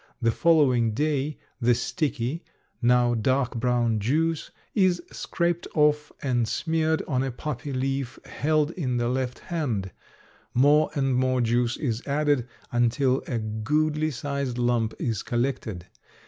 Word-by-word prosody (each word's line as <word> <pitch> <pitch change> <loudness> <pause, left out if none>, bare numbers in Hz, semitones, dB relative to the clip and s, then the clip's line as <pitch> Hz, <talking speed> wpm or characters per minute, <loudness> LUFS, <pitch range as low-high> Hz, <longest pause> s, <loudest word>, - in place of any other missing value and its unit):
The 115 -2 +2
following 130 -7 +3
day 150 +1 0 0.2
the 120 -1 +3
sticky, 145 +1 -2 0.4
now 120 0 +4
dark 125 +3 +1
brown 120 -2 +1
juice, 155 +8 0 0.2
is 185 -3 +3
scraped 170 -1 -1
off 150 -1 +3
and 120 -4 +1
smeared 160 +3 0
on 130 -4 +1
a 135 - -1
poppy 140 +1 -5
leaf 135 -1 -2
held 155 +1 +1
in 130 -9 -2
the 120 0 0
left 125 0 -1
hand; 125 - -3 0.6
more 145 +4 +5
and 135 -2 +1
more 130 0 +2
juice 120 0 +1
is 120 -6 -2
added 145 -3 +1 0.2
until 125 +2 +2
a 120 - -1
goodly 150 +9 0
sized 140 -2 -3
lump 120 -2 +1
is 110 -4 -2
collected. 120 -7 -2
130 Hz, 135 wpm, -26 LUFS, 120-150 Hz, 0.6 s, more